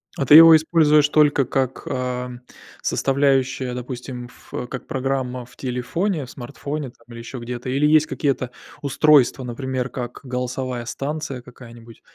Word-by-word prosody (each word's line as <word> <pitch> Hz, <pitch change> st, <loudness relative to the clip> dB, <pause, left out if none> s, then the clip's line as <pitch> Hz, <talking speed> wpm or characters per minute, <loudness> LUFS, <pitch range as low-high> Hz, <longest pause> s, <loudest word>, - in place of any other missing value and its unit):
А 140 Hz, -, -1 dB
ты 140 Hz, -, +5 dB
его 165 Hz, 0 st, +11 dB
используешь 155 Hz, -2 st, +4 dB
только 145 Hz, -3 st, +3 dB
как, 130 Hz, 0 st, -2 dB
ам, 125 Hz, -1 st, -4 dB, 0.4 s
составляющую, 135 Hz, -2 st, +1 dB
допустим, 125 Hz, 0 st, -6 dB
ф 120 Hz, -, -18 dB
э, 125 Hz, -, -4 dB
как 125 Hz, -, -7 dB
программа 130 Hz, -3 st, -2 dB
в -, -, -20 dB
телефоне, 140 Hz, +7 st, -2 dB
в 125 Hz, -, -12 dB
смартфоне, 140 Hz, +2 st, -6 dB
там, 115 Hz, -1 st, -23 dB
или 115 Hz, -, -9 dB
еще 120 Hz, +3 st, -8 dB
где-то? 120 Hz, +1 st, -6 dB
Или 140 Hz, +3 st, +1 dB
есть 155 Hz, +1 st, +4 dB
какие-то 135 Hz, -4 st, -1 dB, 0.3 s
устройства, 140 Hz, -2 st, +3 dB
например, 130 Hz, +1 st, -3 dB
как 120 Hz, -2 st, -6 dB
голосовая 125 Hz, -1 st, -4 dB
станция 140 Hz, +2 st, -4 dB
какая-нибудь, 120 Hz, -2 st, -14 dB
130 Hz, 150 wpm, -22 LUFS, 125-145 Hz, 0.4 s, его